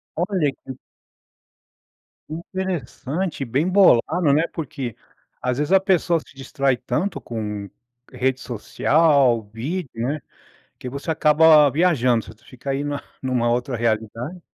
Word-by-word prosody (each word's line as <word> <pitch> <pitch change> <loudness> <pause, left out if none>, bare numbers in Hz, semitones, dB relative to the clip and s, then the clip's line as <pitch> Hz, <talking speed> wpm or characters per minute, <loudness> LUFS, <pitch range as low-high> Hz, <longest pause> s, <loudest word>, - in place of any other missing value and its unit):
Olha 175 -4 0
que 130 -1 -11 1.5
interessante, 165 -2 -4
bem 135 +8 0
bolado, 180 -4 +4
né. 155 +3 +3
Porque 135 -7 -5 0.5
às 125 0 -1
vezes 150 +3 -1
a 195 - +7
pessoa 180 -3 +2
se 155 - -18
distrai 135 0 0
tanto 175 +12 -2
com 105 -3 -5 0.4
rede 130 0 0
social, 130 +2 +2
vídeo, 145 +8 -4
né, 130 +7 -2 0.6
que 125 - -6
você 140 +5 -5
acaba 155 -1 +6
viajando. 130 -9 +1
Tu 110 - -28
fica 130 +2 -7
aí 135 +1 -1
na 145 -1 -3 0.2
numa 125 -3 +1
outra 120 +1 -1
realidade. 115 - -2
140 Hz, 125 wpm, -22 LUFS, 120-160 Hz, 1.5 s, a